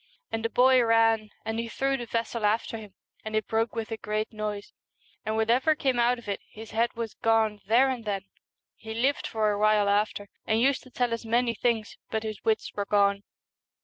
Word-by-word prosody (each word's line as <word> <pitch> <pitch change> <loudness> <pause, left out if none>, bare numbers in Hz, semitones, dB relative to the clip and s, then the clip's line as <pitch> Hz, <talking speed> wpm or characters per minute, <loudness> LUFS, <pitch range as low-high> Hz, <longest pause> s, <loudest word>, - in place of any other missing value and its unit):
And 225 0 -2
the 230 - 0
boy 255 +2 +5
ran, 225 -1 +3 0.2
and 225 +1 -2
he 230 - -2
threw 270 +3 0
the 240 -3 -5
vessel 230 0 -2
after 215 +2 +1
him, 205 -3 -12 0.3
and 220 0 -4
it 215 - +1
broke 225 +1 0
with 225 0 -4
a 225 - -2
great 215 +1 -3
noise, 210 -1 -5 0.5
and 220 0 -2
what 220 +1 +2
ever 265 +6 +3
came 265 -4 0
out 240 +1 +3
of 235 - -13
it, 200 - -3
his 220 +1 -11
head 230 +2 +1
was 230 -2 -4
gone 220 -2 +1
there 240 +5 +5
and 250 -3 -3
then. 200 -3 -2 0.5
He 220 0 -8
lived 265 +5 +1
for 215 -1 +1
a 205 - -2
while 210 -1 +4
after, 205 0 0 0.2
and 220 0 +2
used 265 +3 +2
to 255 - -16
tell 245 -2 0
us 230 - -3
many 235 +1 +1
things, 225 -2 -1
but 220 0 -2
his 215 -2 -6
wits 220 -1 0
were 205 - -2
gone. 200 -1 +3
225 Hz, 215 wpm, -27 LUFS, 215-235 Hz, 0.5 s, boy